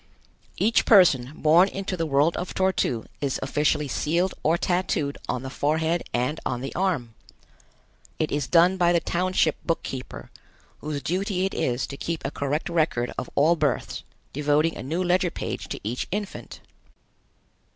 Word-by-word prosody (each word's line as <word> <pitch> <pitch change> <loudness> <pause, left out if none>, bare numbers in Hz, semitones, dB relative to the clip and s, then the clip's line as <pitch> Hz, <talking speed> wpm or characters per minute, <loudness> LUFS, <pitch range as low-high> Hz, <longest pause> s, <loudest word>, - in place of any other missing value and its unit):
Each 225 +2 +3
person 145 - +5
born 165 +6 +5
into 195 -1 -4
the 165 -2 -2
world 145 +3 +3
of 180 - -5
Tor 190 0 +2
tu 115 -9 -1 0.2
is 140 -2 -1
officially 150 +1 +1
sealed 170 +7 0
or 160 +3 +2
tattooed 175 -6 0
on 125 - -2
the 130 - -6
forehead 160 +4 0
and 125 +6 -1
on 125 -1 -2
the 135 - -5
arm. 165 -12 -1 1.0
It 155 - -1
is 145 -2 -1
done 180 +2 +4
by 175 -1 +3
the 170 - +4
township 175 -1 0
book 165 - -1
keeper, 130 -1 -7 0.5
whose 150 -2 -4
duty 185 +1 -1
it 195 - -2
is 125 +1 -1
to 140 - -8
keep 165 -1 -4
a 140 - -2
correct 145 +2 -2
record 155 -8 0
of 125 - -5
all 155 +4 +4
births, 150 -6 -1 0.3
devoting 150 +3 +1
a - - -6
new 160 +8 -2
ledger 180 0 +2
page - - -5
to - - -4
each 115 +5 -3
infant. 205 0 -5
160 Hz, 165 wpm, -25 LUFS, 140-180 Hz, 1.0 s, person